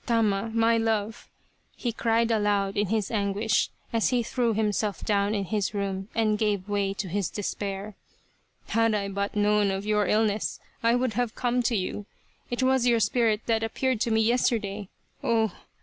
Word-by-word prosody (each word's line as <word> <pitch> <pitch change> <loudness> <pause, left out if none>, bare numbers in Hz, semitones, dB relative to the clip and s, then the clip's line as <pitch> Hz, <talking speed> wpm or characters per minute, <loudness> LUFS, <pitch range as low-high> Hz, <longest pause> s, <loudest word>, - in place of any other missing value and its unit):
Tama! 225 -3 +1
My 230 0 +3
love! 225 -1 -1 0.2
" - - -41 0.2
he 240 - -2
cried 230 0 +1
aloud 205 -2 +1
in 205 0 +1
his 215 0 -1
anguish, 205 0 +1 0.2
as 225 -1 +2
he 245 -2 +1
threw 235 0 0
himself 210 -1 -1
down 205 0 +1
in 200 -1 -1
his 210 +2 -1
room 195 -1 -2
and 215 -2 +2
gave 205 -3 0
way 200 -1 0
to 200 - -3
his 195 +1 -1
despair. 200 0 -4 0.4
" - - -38
Had 225 -1 +2
I 200 -1 -1
but 200 +1 -3
known 210 0 +3
of 195 +1 -3
your 210 -2 +2
illness 215 0 +1 0.2
I 230 +1 +3
would 250 -2 0
have 240 0 -1
come 245 0 +1
to 240 0 0
you. 200 +1 -3 0.4
It 245 +1 -1
was 260 -1 +3
your 235 -1 +4
spirit 220 0 +2
that 225 -1 +1
appeared 230 +1 -1
to 235 - +1
me 220 0 +3
yesterday. 215 -4 0 0.3
Oh 225 -2 +2
215 Hz, 180 wpm, -27 LUFS, 200-230 Hz, 0.4 s, your